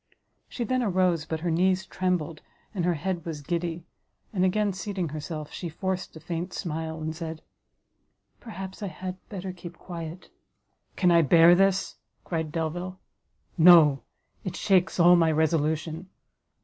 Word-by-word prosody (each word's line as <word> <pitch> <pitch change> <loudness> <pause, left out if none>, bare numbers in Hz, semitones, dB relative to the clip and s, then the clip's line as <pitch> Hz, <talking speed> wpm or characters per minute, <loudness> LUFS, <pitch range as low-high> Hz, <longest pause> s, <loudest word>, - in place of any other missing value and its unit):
She 240 - -4
then 255 +3 0
arose, 185 -7 +1
but 160 -1 -4
her 175 0 -1
knees 185 +3 +2
trembled, 175 -4 -2 0.3
and 180 -5 -1
her 175 -1 +2
head 175 +2 -3
was 160 -3 -5
giddy, 170 +1 -3 0.5
and 185 -3 +1
again 200 +2 +1
seating 190 -3 -3
herself, 155 0 -6
she 175 - -5
forced 185 +3 -4
a - - -8
faint 170 +2 -5
smile, 160 -2 -4
and 155 0 -4
said, 160 -1 -6 1.0
"Perhaps 195 -3 -8
I 205 - -2
had 185 +1 -6
better 190 -2 -5
keep 175 -1 -10
quiet." 170 0 -8 0.6
"Can 180 -2 +3
I 170 -1 +6
bear 165 +3 +7
this!" 195 +1 +2 0.3
cried 160 -3 -3
Delvile, 175 +3 -3 0.6
"no, 160 -5 +7 0.4
it 185 -2 -4
shakes 190 -2 +2
all 175 +1 +7
my 165 -2 +4
resolution! 160 +2 0
175 Hz, 150 wpm, -27 LUFS, 160-185 Hz, 1.0 s, bear